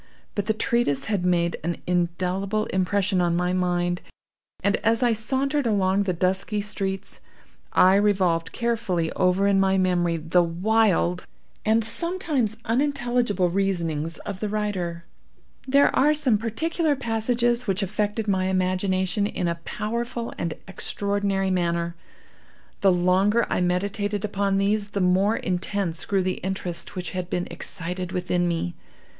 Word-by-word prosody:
But 205 Hz, -1 st, -2 dB
the 220 Hz, -, +3 dB
treatise 230 Hz, -, 0 dB
had 205 Hz, -5 st, -1 dB
made 170 Hz, -2 st, +1 dB
an 170 Hz, +1 st, -2 dB
indelible 180 Hz, +4 st, 0 dB
impression 190 Hz, 0 st, +1 dB
on 170 Hz, -1 st, +1 dB
my 180 Hz, +1 st, 0 dB
mind, 175 Hz, -1 st, 0 dB, 0.6 s
and, 200 Hz, +1 st, +2 dB
as 225 Hz, +2 st, +1 dB
I 240 Hz, -1 st, +4 dB
sauntered 265 Hz, +5 st, 0 dB
along 195 Hz, -2 st, +2 dB
the 185 Hz, -, +1 dB
dusky 190 Hz, +4 st, 0 dB
streets, 195 Hz, -2 st, -3 dB, 0.5 s
I 185 Hz, +1 st, +6 dB
revolved 185 Hz, -5 st, +2 dB
carefully 215 Hz, -9 st, -1 dB
over 185 Hz, +1 st, +2 dB
in 200 Hz, -1 st, +4 dB
my 195 Hz, 0 st, +3 dB
memory 175 Hz, -2 st, +1 dB
the 165 Hz, +3 st, +2 dB
wild 175 Hz, -, +1 dB, 0.4 s
and 220 Hz, +1 st, +3 dB
sometimes 300 Hz, -, -1 dB
unintelligible 240 Hz, -7 st, +1 dB
reasonings 170 Hz, -5 st, -1 dB
of 200 Hz, -2 st, -5 dB
the 210 Hz, -, -2 dB
writer. 185 Hz, -5 st, -2 dB, 0.6 s
There 280 Hz, +2 st, +4 dB
are 300 Hz, +2 st, +4 dB
some 260 Hz, -8 st, +2 dB
particular 300 Hz, +7 st, 0 dB
passages 240 Hz, 0 st, 0 dB
which 195 Hz, +1 st, +1 dB
affected 210 Hz, +2 st, -2 dB
my 190 Hz, -2 st, +1 dB
imagination 185 Hz, +1 st, +1 dB
in 180 Hz, -, -2 dB
a 170 Hz, 0 st, -3 dB
powerful 235 Hz, +2 st, -3 dB
and 170 Hz, -2 st, -3 dB
extraordinary 200 Hz, 0 st, -1 dB
manner. 170 Hz, -1 st, 0 dB, 0.8 s
The 195 Hz, -, +4 dB
longer 185 Hz, +6 st, +3 dB
I -, -, +1 dB
meditated 200 Hz, +3 st, -1 dB
upon 200 Hz, -1 st, 0 dB
these 205 Hz, +1 st, +1 dB
the 200 Hz, -, -3 dB
more 190 Hz, +4 st, +3 dB
intense 180 Hz, -1 st, -2 dB
grew 195 Hz, -2 st, +1 dB
the 185 Hz, 0 st, -1 dB
interest 185 Hz, -2 st, -4 dB
which 180 Hz, -1 st, -4 dB
had 180 Hz, -1 st, -4 dB
been 180 Hz, 0 st, -2 dB
excited 180 Hz, 0 st, -4 dB
within 180 Hz, -1 st, 0 dB
me. 165 Hz, -, -1 dB
195 Hz, 140 wpm, -24 LUFS, 180-215 Hz, 0.8 s, I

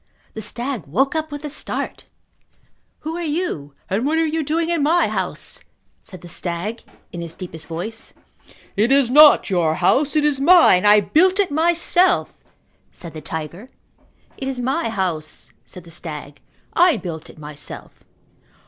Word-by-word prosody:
The 220 Hz, -, -6 dB
stag 235 Hz, -, -4 dB
woke 265 Hz, -, +1 dB
up 315 Hz, -1 st, -3 dB
with 290 Hz, +1 st, -6 dB
a -, -, -3 dB
start. 295 Hz, -, -5 dB, 1.0 s
"Who 315 Hz, +2 st, -4 dB
are -, -, -4 dB
you 295 Hz, -, -3 dB
and 200 Hz, +5 st, -1 dB
what 305 Hz, +4 st, +1 dB
are 325 Hz, -, +2 dB
you 320 Hz, +1 st, -1 dB
doing 325 Hz, +3 st, -1 dB
in 335 Hz, -3 st, 0 dB
my 330 Hz, +5 st, +3 dB
house?" -, -, -4 dB, 0.4 s
said 185 Hz, -4 st, -12 dB
the 175 Hz, -, -11 dB
stag 175 Hz, +6 st, -4 dB, 0.3 s
in 175 Hz, -, -6 dB
his 170 Hz, -1 st, -8 dB
deepest 165 Hz, -4 st, -9 dB
voice. 185 Hz, +8 st, -6 dB, 0.6 s
"It 220 Hz, +5 st, +2 dB
is 275 Hz, -3 st, +4 dB
not 295 Hz, -6 st, +7 dB
your 165 Hz, -4 st, +2 dB
house. 275 Hz, -, +2 dB
It 300 Hz, -1 st, +3 dB
is 290 Hz, -3 st, +1 dB
mine. 275 Hz, -, +6 dB
I 210 Hz, 0 st, +7 dB
built 370 Hz, -, +3 dB
it 390 Hz, -6 st, +2 dB
myself," 345 Hz, +3 st, +2 dB, 0.5 s
said 170 Hz, -2 st, -10 dB
the 155 Hz, -, -8 dB
tiger. 160 Hz, -, -6 dB, 0.7 s
"It 265 Hz, -, -5 dB
is 265 Hz, -2 st, -3 dB
my 260 Hz, +2 st, -1 dB
house," 180 Hz, -8 st, -4 dB
said 180 Hz, -, -12 dB
the 170 Hz, -, -14 dB
stag. 150 Hz, -3 st, -8 dB, 0.3 s
"I 345 Hz, -5 st, +4 dB
built 165 Hz, -5 st, -7 dB
it -, -, -15 dB
myself." 150 Hz, -1 st, -10 dB
235 Hz, 165 wpm, -21 LUFS, -, 1.0 s, not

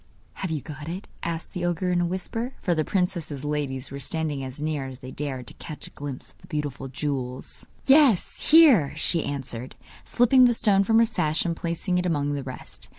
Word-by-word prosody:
'Have 190 Hz, -, -4 dB
you 155 Hz, -3 st, -2 dB
got 150 Hz, +1 st, -8 dB
it?' 185 Hz, +4 st, -6 dB
asked 165 Hz, -1 st, -4 dB
the 180 Hz, -, -3 dB
ogre 175 Hz, +1 st, 0 dB
in 175 Hz, -1 st, +2 dB
a 175 Hz, -, +1 dB
whisper, 225 Hz, +8 st, -3 dB
for 175 Hz, -, +1 dB
the 155 Hz, -2 st, +1 dB
princess's 170 Hz, -6 st, -2 dB
ladies 140 Hz, -4 st, -2 dB
were 140 Hz, -, -5 dB
standing 150 Hz, 0 st, -2 dB
as 130 Hz, +1 st, -6 dB
near 150 Hz, -3 st, -2 dB
as 130 Hz, -1 st, -9 dB
they 130 Hz, -, -8 dB
dared 135 Hz, -3 st, -4 dB
to -, -, -7 dB
catch 155 Hz, -, -9 dB
a -, -, -11 dB
glimpse 145 Hz, -3 st, -7 dB
of -, -, -31 dB
the 180 Hz, -, -17 dB
beautiful 145 Hz, -5 st, -3 dB
jewels. 130 Hz, -2 st, -4 dB, 0.2 s
'Yes, 270 Hz, -, +4 dB
here,' 285 Hz, -, +7 dB
she 160 Hz, +1 st, +1 dB
answered, 130 Hz, -3 st, -5 dB, 0.3 s
slipping 250 Hz, +1 st, +5 dB
the 240 Hz, -1 st, +4 dB
stone 200 Hz, -4 st, +4 dB
from 225 Hz, +3 st, +3 dB
her 230 Hz, -, +6 dB
sash 160 Hz, -9 st, 0 dB
and 170 Hz, -1 st, 0 dB
placing 170 Hz, +2 st, -1 dB
it 180 Hz, -, 0 dB
among 145 Hz, -3 st, 0 dB
the 140 Hz, -, -2 dB
rest. 130 Hz, -1 st, -7 dB
160 Hz, 210 wpm, -25 LUFS, 140-185 Hz, 0.3 s, here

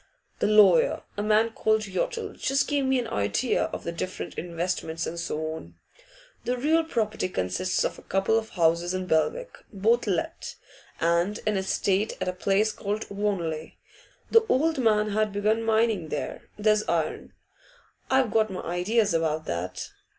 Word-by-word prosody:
'The -, -, +2 dB
lawyer, 205 Hz, -6 st, +5 dB
a 205 Hz, -, -2 dB
man 215 Hz, +2 st, +3 dB
called 220 Hz, -1 st, +1 dB
Yottle, 195 Hz, -, -3 dB
just 275 Hz, +1 st, 0 dB
gave 285 Hz, -2 st, +1 dB
me 265 Hz, 0 st, +2 dB
an 245 Hz, -2 st, -1 dB
idea 105 Hz, -, 0 dB
of -, -, -6 dB
the 170 Hz, -, -3 dB
different 185 Hz, +2 st, -5 dB
investments 170 Hz, -1 st, -3 dB
and 170 Hz, -, -5 dB
so 155 Hz, -1 st, -3 dB
on. 160 Hz, -, -10 dB, 0.7 s
The 250 Hz, +1 st, -1 dB
real 315 Hz, +6 st, +2 dB
property 220 Hz, -, -1 dB
consists 135 Hz, -, -1 dB
of -, -, -2 dB
a -, -, -13 dB
couple 195 Hz, +3 st, +1 dB
of 225 Hz, 0 st, 0 dB
houses 170 Hz, 0 st, +1 dB
in 185 Hz, 0 st, -2 dB
Belwick, 475 Hz, -, 0 dB
both 225 Hz, +3 st, +2 dB
let, 180 Hz, -5 st, -2 dB, 0.4 s
and 170 Hz, +5 st, +1 dB
an 215 Hz, -1 st, +1 dB
estate 195 Hz, +2 st, 0 dB
at -, -, -2 dB
a 185 Hz, -, 0 dB
place 200 Hz, +3 st, +1 dB
called 210 Hz, +1 st, -4 dB
Wanley. 175 Hz, -6 st, -2 dB, 0.5 s
The 455 Hz, 0 st, +6 dB
old 315 Hz, +3 st, +2 dB
man 215 Hz, -3 st, +3 dB
had 215 Hz, 0 st, +1 dB
begun 210 Hz, +3 st, +1 dB
mining 220 Hz, -5 st, +1 dB
there; 145 Hz, -, -5 dB
there's 215 Hz, 0 st, +3 dB
iron. 160 Hz, -2 st, -1 dB, 0.8 s
I've 265 Hz, -4 st, +3 dB
got 220 Hz, -1 st, +2 dB
my 185 Hz, -, -5 dB
ideas 200 Hz, +5 st, +1 dB
about 160 Hz, -1 st, 0 dB
that. 85 Hz, +2 st, -4 dB
205 Hz, 160 wpm, -26 LUFS, 170-225 Hz, 0.8 s, The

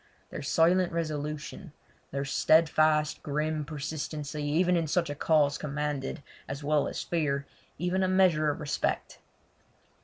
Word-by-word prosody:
Their -, -, -5 dB
silent 175 Hz, +5 st, +3 dB
resolution, 155 Hz, +1 st, -4 dB, 0.4 s
their 140 Hz, 0 st, -3 dB
steadfast, 155 Hz, +1 st, +3 dB
grim, 150 Hz, +1 st, -1 dB
persistency 150 Hz, 0 st, -4 dB
even 175 Hz, +5 st, +2 dB
in 165 Hz, -2 st, +1 dB
such 170 Hz, 0 st, 0 dB
a -, -, -2 dB
cause 150 Hz, -1 st, +2 dB
commanded, 145 Hz, -1 st, -3 dB, 0.2 s
as 140 Hz, +1 st, -6 dB
well 150 Hz, 0 st, +2 dB
as -, -, -4 dB
fear, 145 Hz, -5 st, -1 dB, 0.3 s
even 180 Hz, +3 st, 0 dB
a 185 Hz, -, +2 dB
measure 185 Hz, -5 st, +3 dB
of 145 Hz, -, -2 dB
respect. 150 Hz, -2 st, -2 dB
155 Hz, 130 wpm, -29 LUFS, 145-165 Hz, 0.4 s, silent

